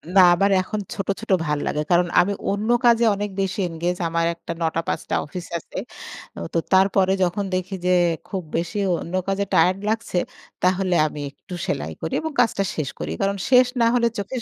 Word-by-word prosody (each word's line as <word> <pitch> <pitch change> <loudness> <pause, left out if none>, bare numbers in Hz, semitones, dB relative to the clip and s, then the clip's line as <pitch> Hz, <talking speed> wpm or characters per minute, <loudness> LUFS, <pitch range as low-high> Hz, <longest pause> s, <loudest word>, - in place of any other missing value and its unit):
না - - +8
আমার 195 +3 +2
এখন 210 +3 -4
ছোট, 195 - -4
ছোট, 225 - -5
ভাল 150 -1 0
লাগে। 150 - -1
কারণ 175 0 +4
আমি 195 +3 +3 0.2
অন্য 210 +3 -2 0.2
কাজে 235 0 +5
অনেক 205 +1 -3
বেশি 195 +1 -2
এনগেজ 175 +2 -2
আমার 165 0 0
একটা 170 - -8
৯ 165 0 0
৫ - - -1
টা - - +1
অফিস 175 +4 -7
আছে। - - -11 0.6
ও - - -5
তো 165 - +2
তারপরে 190 0 +4
যখন 185 +3 0
দেখি 185 +1 -3
যে, 180 - +3 0.4
খুব 190 -3 -4
বেশি 170 +4 -3 0.2
অন্য 170 - -8
কাজে 195 +1 0
টায়ার্ড 185 +2 +4
লাগছে, 220 -4 -1 0.5
তাহলে 185 0 +2
আমি 150 -1 -7
একটু 180 - -13
সেলাই 80 +2 -2
করি 160 - -4
এবং 320 0 -3
কাজটা 225 -5 +3
শেষ 155 -4 -2
করি। 75 +1 -4
কারণ 200 0 0
শেষ 250 -1 +6
না - - +5
হলে 235 -1 +3
চোখের 235 +5 -4
185 Hz, 195 wpm, -22 LUFS, 170-205 Hz, 0.6 s, না